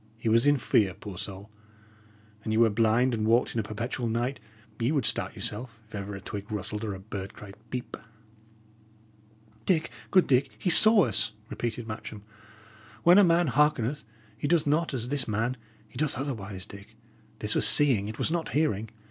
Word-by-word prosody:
He 115 Hz, 0 st, -2 dB
was 115 Hz, +4 st, +3 dB
in 145 Hz, 0 st, +4 dB
fear, 100 Hz, -6 st, +1 dB
poor 100 Hz, -3 st, -9 dB
soul! 100 Hz, +3 st, -8 dB, 0.9 s
An 110 Hz, -, -3 dB
ye 110 Hz, -, +1 dB
were 115 Hz, -1 st, +4 dB
blind, 115 Hz, +4 st, +2 dB
and 110 Hz, -2 st, -2 dB
walked 115 Hz, +2 st, +2 dB
in 115 Hz, -, -2 dB
a -, -, -1 dB
perpetual 115 Hz, +3 st, -4 dB
night, 120 Hz, +4 st, -2 dB, 0.4 s
ye 120 Hz, +4 st, 0 dB
would 140 Hz, -7 st, 0 dB
start 115 Hz, -, -1 dB
yourself, 115 Hz, -2 st, -5 dB
if -, -, -22 dB
ever 100 Hz, -1 st, -5 dB
a -, -, -7 dB
twig 100 Hz, +2 st, -7 dB
rustled 105 Hz, +1 st, -4 dB
or 105 Hz, -3 st, -3 dB
a -, -, -9 dB
bird 95 Hz, -1 st, -8 dB
cried 105 Hz, -3 st, -11 dB, 0.2 s
'Peep.'" 125 Hz, -1 st, -6 dB, 1.7 s
"Dick, 165 Hz, -4 st, +1 dB, 0.2 s
good 185 Hz, -2 st, +4 dB
Dick, 135 Hz, +1 st, +1 dB
he 180 Hz, -, +1 dB
saw 215 Hz, +1 st, +8 dB
us," 110 Hz, -1 st, 0 dB, 0.2 s
repeated 120 Hz, -1 st, -4 dB
Matcham. 110 Hz, -1 st, -8 dB, 0.8 s
"When 175 Hz, +3 st, +7 dB
a -, -, +7 dB
man 170 Hz, -1 st, +3 dB
hearkeneth, 145 Hz, 0 st, +1 dB, 0.3 s
he 115 Hz, -, -4 dB
doth 170 Hz, -1 st, +2 dB
not 155 Hz, +3 st, +1 dB
as 120 Hz, -1 st, -4 dB
this 140 Hz, -2 st, +1 dB
man; 115 Hz, +4 st, -1 dB, 0.3 s
he 110 Hz, -, -11 dB
doth 150 Hz, -3 st, -1 dB
otherwise, 105 Hz, -8 st, -5 dB
Dick. 100 Hz, +2 st, -13 dB, 0.4 s
This 105 Hz, -1 st, -1 dB
was -, -, +5 dB
seeing; 125 Hz, -9 st, +6 dB
it 110 Hz, -, -7 dB
was -, -, 0 dB
not 170 Hz, -1 st, -3 dB
hearing. 110 Hz, -9 st, 0 dB
115 Hz, 185 wpm, -27 LUFS, 105-140 Hz, 1.7 s, saw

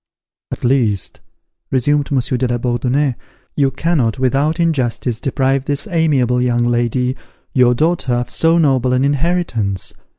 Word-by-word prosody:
"At -, -, -6 dB
least," 120 Hz, -6 st, 0 dB, 0.5 s
resumed 145 Hz, +3 st, +1 dB
Monsieur 130 Hz, -2 st, 0 dB
de 125 Hz, +1 st, 0 dB
la 120 Hz, 0 st, -1 dB
Bourdonnais, 125 Hz, +3 st, 0 dB, 0.4 s
"you 140 Hz, -2 st, +2 dB
cannot 135 Hz, -4 st, 0 dB
without 140 Hz, +5 st, 0 dB
injustice, 130 Hz, -7 st, 0 dB
deprive 135 Hz, -1 st, 0 dB
this 145 Hz, +4 st, -1 dB
amiable 140 Hz, -, +1 dB
young 120 Hz, -1 st, +1 dB
lady, 120 Hz, +2 st, 0 dB, 0.4 s
your 125 Hz, -1 st, +4 dB
daughter, 155 Hz, -2 st, 0 dB
of 120 Hz, 0 st, -3 dB
so 165 Hz, +1 st, +2 dB
noble 130 Hz, -5 st, +2 dB
an 130 Hz, +2 st, +2 dB
inheritance. 140 Hz, -, -1 dB
130 Hz, 135 wpm, -17 LUFS, 120-145 Hz, 0.5 s, your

